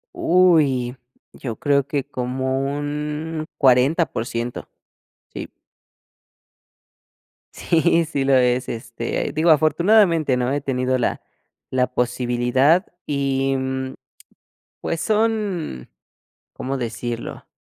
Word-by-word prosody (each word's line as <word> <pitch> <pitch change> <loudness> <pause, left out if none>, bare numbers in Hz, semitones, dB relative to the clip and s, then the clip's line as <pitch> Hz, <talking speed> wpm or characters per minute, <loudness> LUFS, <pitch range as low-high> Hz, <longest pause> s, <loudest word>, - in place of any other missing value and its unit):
Uy, 150 -9 +3 0.4
yo 115 -5 -6
creo 140 +1 +1
que 140 -2 -1
como 130 -1 -2
un 150 +3 -3
40%, 125 -3 +1 0.6
sí. - - -7 2.0
Sí, 165 0 +2
sí 140 -3 -2
lo 135 - +3
es, 125 0 +2
este, 115 0 -3
digo 160 +2 +2
afortunadamente, 160 -1 +4
¿no? 125 +1 0
He 145 0 -1
tenido 130 -1 0
la 125 - -1 0.5
la 125 -1 +1
posibilidad 125 +7 +2 0.2
y, 135 -1 0
mm, 130 0 -3 0.9
pues, 165 - -2
son, 210 - -1 0.7
¿cómo 135 +1 -4
decirlo? 120 -1 -5
135 Hz, 90 wpm, -22 LUFS, 125-155 Hz, 2.0 s, afortunadamente